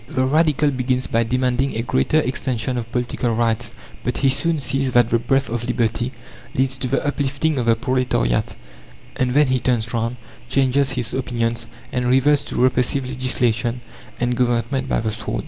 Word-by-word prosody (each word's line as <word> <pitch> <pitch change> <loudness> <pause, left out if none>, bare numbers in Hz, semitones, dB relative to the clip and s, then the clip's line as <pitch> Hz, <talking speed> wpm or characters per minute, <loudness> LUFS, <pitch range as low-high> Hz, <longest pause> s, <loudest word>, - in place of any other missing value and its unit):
The 130 -3 0
Radical 150 0 +3
begins 130 0 0
by 115 - +1
demanding 125 +2 0
a 115 - -1
greater 120 - +2
extension 130 -2 -2
of 115 -1 -4
political 120 -1 -1
rights, 115 0 0 0.3
but 125 - -1
he 135 - +3
soon 165 +5 +2
sees 135 -1 -1
that 120 -1 +4
the 115 - +3
breath 135 +3 +1
of 120 0 -3
liberty 120 0 0 0.4
leads 130 0 +1
to 130 - -2
the 135 +3 0
uplifting 145 +1 0
of 120 - -2
the 115 - +5
proletariat, 120 - 0 0.6
and 130 0 0
then 150 +1 +6
he 130 -1 +1
turns 120 -2 0
round, 115 +1 -1 0.3
changes 135 0 +2
his 120 -4 -3
opinions, 115 -2 -2 0.2
and 125 -1 -1
reverts 135 +4 +4
to - - -4
repressive 130 +1 +2
legislation 125 -2 0 0.4
and 125 0 0
government 125 +2 0
by - - +1
the 110 -1 -1
sword. - - -3
125 Hz, 175 wpm, -21 LUFS, 120-135 Hz, 0.6 s, then